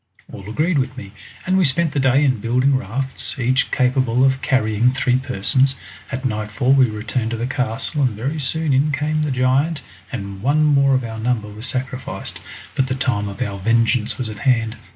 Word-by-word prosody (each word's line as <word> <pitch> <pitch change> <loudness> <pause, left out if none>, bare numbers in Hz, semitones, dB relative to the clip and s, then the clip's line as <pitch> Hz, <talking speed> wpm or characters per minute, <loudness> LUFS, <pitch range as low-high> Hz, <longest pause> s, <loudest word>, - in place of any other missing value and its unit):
All 100 +1 -9
agreed 155 +6 +1
with 130 0 -2
me, 100 -6 -8 0.3
and 185 +1 +2
we - - +4
spent 160 +2 +2
the 145 - -1
day 135 +2 +3
in 130 -4 +1
building 125 +5 +2
rafts, 130 +4 -3
each 130 +1 +1
capable 125 -1 +2
of 130 0 +1
carrying 120 -3 +2
three 125 -1 +2
persons. 130 +2 +1 0.4
At 130 +1 -4
nightfall 110 +3 0
we 130 -3 +5
returned 110 +2 -3
to 115 - -3
the 115 - -2
castle, 130 +3 -2
and 125 -6 +1
very 140 +8 -3
soon 150 +2 0
in 140 +3 +2
came 155 +1 0
the 150 - 0
giant, 135 +5 +1 0.3
and 100 -6 -6
one 145 +6 +2
more 140 -2 +4
of 130 - 0
our 110 -1 -6
number 110 -2 -1
was 110 +4 -6
sacrificed. 130 +1 -5 0.3
But 130 - 0
the 130 - -2
time 115 -6 -1
of 100 - -3
our 100 -1 -5
vengeance 115 +2 +1
was 125 - -2
at 110 -1 -6
hand! 115 -4 +1
130 Hz, 195 wpm, -20 LUFS, 115-135 Hz, 0.4 s, we